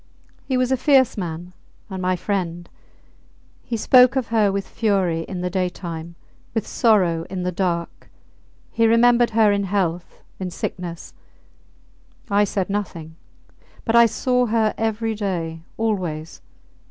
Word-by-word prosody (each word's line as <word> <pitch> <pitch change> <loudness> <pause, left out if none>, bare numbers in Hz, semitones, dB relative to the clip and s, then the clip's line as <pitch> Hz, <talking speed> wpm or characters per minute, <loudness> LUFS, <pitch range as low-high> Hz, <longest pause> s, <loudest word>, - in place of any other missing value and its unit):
He 260 - +1
was 255 0 +1
a 265 - +3
fierce 265 -3 +4
man, 175 -1 -5 0.3
and 190 -2 -6
my 185 0 +1
friend. 175 -2 -3 1.0
He 235 - -3
spoke 250 +3 +6
of 260 -3 -1
her 215 -3 +3
with 195 0 -3
fury 195 -7 0
in 185 -2 -5
the 180 - -1
daytime, 170 -3 -4 0.4
with 225 - 0
sorrow 185 -8 +2
in 185 -1 -4
the 180 - -1
dark; 170 -2 -3 0.6
he 230 0 +3
remembered 235 +1 +4
her 215 -2 +5
in 200 0 0
health, 180 -3 -2 0.2
in 185 -1 -3
sickness. 175 -1 -6 1.2
I 205 +1 +4
said 195 -1 -2
nothing; 170 -6 -4 0.7
but 230 - +1
I 235 0 +8
saw 250 +2 +1
her 220 -1 +1
every 225 0 -1
day 170 -6 -3 0.2
always! 180 -8 -3
195 Hz, 140 wpm, -22 LUFS, 175-225 Hz, 1.2 s, I